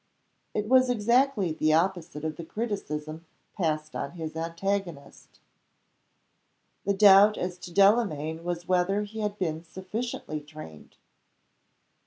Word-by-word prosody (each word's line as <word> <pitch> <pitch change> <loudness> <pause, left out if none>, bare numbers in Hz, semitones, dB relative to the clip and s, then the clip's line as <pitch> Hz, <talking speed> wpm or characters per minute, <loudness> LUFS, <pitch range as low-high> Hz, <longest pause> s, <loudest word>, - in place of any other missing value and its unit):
It 210 0 -1
was 255 +1 +5
exactly 240 -3 +2
the 155 0 +1
opposite 165 -2 0
of 155 -1 -3
the 170 - -7
criticism 160 -7 -5 0.3
passed 155 -4 -2
on 140 - -4
his 160 -2 -6
antagonist. 170 -1 -4 1.5
The 200 0 +1
doubt 205 +1 +7
as 180 0 -4
to 175 - -9
Delamayn 170 -6 +2
was 175 0 -4
whether 185 +3 +1
he 215 +2 -8
had 210 -1 -2
been 160 -4 -2
sufficiently 190 -2 -5
trained. 145 - -12
180 Hz, 120 wpm, -27 LUFS, 160-205 Hz, 1.5 s, doubt